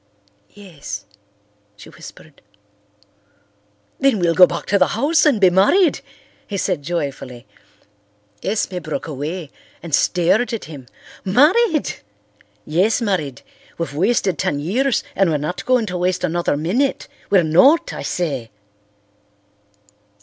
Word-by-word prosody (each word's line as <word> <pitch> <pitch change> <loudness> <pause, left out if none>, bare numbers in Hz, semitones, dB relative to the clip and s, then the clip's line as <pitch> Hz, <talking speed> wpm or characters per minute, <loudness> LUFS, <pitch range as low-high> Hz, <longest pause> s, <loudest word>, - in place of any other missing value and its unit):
"Yes," 155 - -9 0.7
she 105 - -14
whispered. - - -14 1.6
"Then 270 -4 +3
we'll 170 -3 +1
go 180 +1 +7
back - - -5
to 200 - +1
the 185 - +4
house 310 +6 +3
and 265 -8 +2
be 185 -2 +5
married," 290 - +3 0.5
he 200 - -4
said 185 -5 -1
joyfully. 140 -6 -5 1.0
Esme 195 -2 -2
broke 155 -2 -5
away 155 +2 -5 0.3
and 170 -3 -8
stared 190 - +2
at 230 - -4
him. 140 -5 -11 0.4
"Married!" 305 - +2 0.7
"Yes, 185 +10 +1
married. 175 - -2 0.3
We've 165 -4 -4
wasted 190 +1 0
ten 145 - -1
years 230 - 0
and 195 -3 +2
we're 155 - +1
not 150 +5 -4
going 250 -3 +3
to 180 -3 -4
waste 180 0 -1
another 175 -3 0
minute. 215 - -1 0.2
We're 190 -3 +4
not, 185 - +4
I - - -6
say." 140 -10 -3
180 Hz, 125 wpm, -19 LUFS, 155-225 Hz, 1.6 s, go